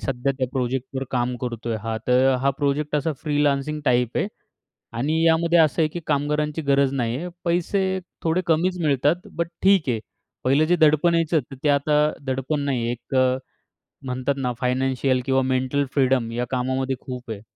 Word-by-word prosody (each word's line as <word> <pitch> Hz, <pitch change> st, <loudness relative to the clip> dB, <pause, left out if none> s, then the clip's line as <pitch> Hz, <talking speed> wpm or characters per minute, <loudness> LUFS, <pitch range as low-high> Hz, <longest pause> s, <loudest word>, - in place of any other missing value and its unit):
सध्या 135 Hz, +1 st, -1 dB
त्या 130 Hz, -, +1 dB
प्रोजेक्टवर 130 Hz, +1 st, -2 dB
काम 125 Hz, 0 st, 0 dB
करतो 120 Hz, -2 st, -5 dB
आहे. 115 Hz, -1 st, -1 dB
हां, 115 Hz, -1 st, -2 dB
तर 130 Hz, +1 st, +4 dB
हा 140 Hz, +1 st, +3 dB
प्रोजेक्ट 145 Hz, +1 st, 0 dB
असा 155 Hz, +2 st, 0 dB
फ्रीलान्सिंग 145 Hz, 0 st, 0 dB
टाइप 125 Hz, -2 st, +1 dB
आहे -, -, +1 dB, 0.7 s
आणि 155 Hz, +6 st, +1 dB
यामध्ये 170 Hz, +1 st, +4 dB
असं 160 Hz, +1 st, +3 dB
आहे 155 Hz, -, +2 dB
की 175 Hz, -, -4 dB
कामगारांची 150 Hz, +1 st, 0 dB
गरज 140 Hz, -1 st, +2 dB
नाही 120 Hz, -2 st, -1 dB
आहे. 175 Hz, +5 st, -4 dB, 0.2 s
पैसे 190 Hz, +2 st, 0 dB, 0.3 s
थोडे 165 Hz, +2 st, +2 dB
कमीच 175 Hz, +3 st, +1 dB
मिळतात 150 Hz, -, +1 dB
बट 170 Hz, -1 st, -1 dB
ठीक 190 Hz, -7 st, +4 dB
आहे. 115 Hz, -3 st, 0 dB, 0.4 s
पहिलं 140 Hz, +4 st, +4 dB
जे 175 Hz, +3 st, +2 dB
दडपण 160 Hz, +1 st, +4 dB
यायचं 165 Hz, -1 st, +2 dB
तर -, -, -7 dB
ते -, -, +3 dB
आता 145 Hz, +1 st, +3 dB, 0.3 s
दडपण 135 Hz, +3 st, -1 dB
नाही 130 Hz, -4 st, 0 dB
आहे. 120 Hz, -, 0 dB
एक 120 Hz, +2 st, -8 dB
अ, 130 Hz, 0 st, +3 dB, 0.7 s
म्हणतात 130 Hz, +2 st, -1 dB
ना 125 Hz, -2 st, -1 dB
फायनान्शियल 130 Hz, +1 st, +1 dB
किंवा 135 Hz, 0 st, +2 dB
मेंटल 130 Hz, +2 st, 0 dB
फ्रीडम 130 Hz, -4 st, +2 dB
या 120 Hz, +1 st, -2 dB
कामामध्ये 130 Hz, +1 st, -1 dB
खूप 125 Hz, -2 st, -7 dB
आहे. 105 Hz, -2 st, -6 dB
135 Hz, 180 wpm, -23 LUFS, 125-155 Hz, 0.7 s, तर